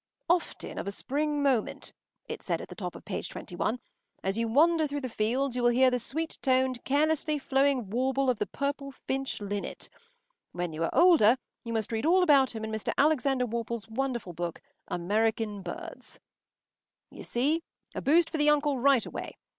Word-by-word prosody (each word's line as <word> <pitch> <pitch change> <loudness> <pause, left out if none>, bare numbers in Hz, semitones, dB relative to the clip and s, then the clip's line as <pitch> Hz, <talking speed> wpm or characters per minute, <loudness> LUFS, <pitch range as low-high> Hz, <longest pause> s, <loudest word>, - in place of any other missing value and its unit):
“Often 350 -1 -1
of - - -5
a - - -1
spring 290 +6 -1
morning,” 260 -6 +1 0.4
it - - -6
said - - -1
at - - -8
the - - -7
top - - -5
of - - -11
page - - -4
twenty 180 - -8
one, 215 +7 -1 0.4
“as 195 +1 0
you 230 +1 0
wander 315 +6 +4
through 285 0 -4
the 260 - -3
fields, 245 +4 0
you 250 - -1
will 240 - +5
hear 255 +2 +4
the 250 - +1
sweet 320 +7 -3
toned, 260 -2 +1
carelessly 305 +2 +1
flowing 270 -5 +1
warble 265 +3 +1
of 250 -4 +1
the - - -1
purple 280 0 -3
finch 270 0 -3
linnet. 205 -1 -5 0.6
When 175 -2 -3
you 160 +2 -2
are - - +1
older 300 - +6 0.3
you 230 - -5
must 220 -1 -1
read 225 +6 -1
all 365 +2 +5
about 275 -7 +4
him 220 - -5
in 220 - -5
Mr. 220 -1 -2
Alexander 275 -3 +3
Worple’s 235 -1 -4
wonderful 240 -5 -3
book—_American 205 +5 -2
Birds_.” 175 - -8 0.9
You - - -10
see. 290 +7 0 0.3
A - - -4
boost 325 +3 +4
for 320 - -2
the 295 0 +4
uncle 295 -2 +2
right 270 -2 +4
away. - - -7
260 Hz, 185 wpm, -29 LUFS, 220-285 Hz, 0.9 s, older